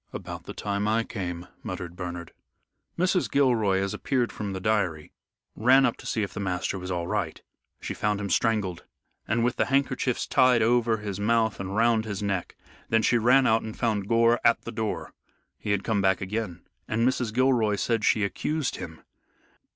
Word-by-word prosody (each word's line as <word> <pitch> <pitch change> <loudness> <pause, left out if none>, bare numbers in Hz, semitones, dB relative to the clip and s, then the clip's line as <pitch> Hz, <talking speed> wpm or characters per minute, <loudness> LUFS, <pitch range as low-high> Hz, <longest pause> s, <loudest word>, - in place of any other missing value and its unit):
"About - - -7
the - - -7
time 100 0 -2
I 110 +2 +2
came," 90 -6 -5
muttered 85 0 -6
Bernard. 85 -2 -6 0.6
Mrs. 180 +1 +1
Gilroy 115 -8 +3
as 95 0 -1
appeared 125 -3 -1
from 105 -2 -5
the 95 - -4
diary 95 -6 -1 0.4
ran 130 +4 +5
up 120 - +1
to - - -10
see 110 - 0
if 100 - -5
the - - -5
master 95 0 -2
was 90 0 -7
all 90 -2 -2
right. - - -2 0.4
She - - -5
found 105 -1 -1
him 100 -1 -3
strangled, 105 -6 0 0.4
and 115 +1 +1
with 120 0 0
the - - +2
handkerchiefs 135 -2 0
tied 125 -3 +4
over 115 -1 +3
his 105 -2 -5
mouth 110 +1 +1
and 95 0 -4
round 115 0 +3
his 105 -2 -4
neck. 100 -3 -2 0.3
Then 115 0 +3
she 120 - +3
ran 125 +4 +5
out 110 -1 +3
and 110 -1 -7
found 105 -5 0
Gore 115 +1 +4
at 115 - +3
the 115 - -6
door. 110 -2 -4 0.5
He - - -6
had 100 -1 +1
come 110 -3 0
back 95 -1 +2
again, 100 -2 -4 0.2
and 115 +2 +1
Mrs. 125 -3 0
Gilroy 120 -3 +2
said 115 +1 0
she 105 -1 +3
accused 150 +8 -2
him. 80 -3 -9
110 Hz, 190 wpm, -26 LUFS, 95-120 Hz, 0.6 s, ran